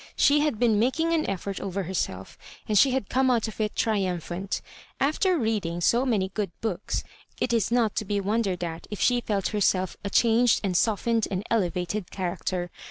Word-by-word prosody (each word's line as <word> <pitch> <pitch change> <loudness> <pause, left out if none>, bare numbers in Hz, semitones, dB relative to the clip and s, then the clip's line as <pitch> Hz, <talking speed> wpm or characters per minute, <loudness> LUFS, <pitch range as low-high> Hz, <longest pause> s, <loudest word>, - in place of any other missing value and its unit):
She 290 +1 +4
had 295 -6 +1
been 225 -2 +3
making 320 +8 +1
an 320 -2 +1
effort 195 0 -4
oyer 195 0 -3
herself^ 160 - -3 0.3
and 215 - 0
she 265 +7 +6
had 255 -5 -1
come 260 +1 +2
out 235 -3 +2
of 220 0 -6
it 210 -1 -1
tri 220 -2 +1
umphant; 180 0 -3 0.4
after 335 +6 +2
reading 210 - -1
so 240 +9 +2
many 200 -6 +1
good 210 -3 -1
books, 210 -4 -2 0.4
it 240 - 0
is 230 -2 +1
not 235 -3 +2
to 215 - -1
be 205 0 -1
wondered 200 -3 -1
at 165 -1 -5
if 210 - -6
she 245 -1 +3
felt 200 -4 -1
herself 190 -3 +1
a 200 - -2
changed 235 +2 +4
and 190 -3 -1
softened 225 +3 +1
and 190 0 -2
eleyated 180 -2 -1
character. 180 -1 -3
210 Hz, 190 wpm, -26 LUFS, 185-235 Hz, 0.4 s, she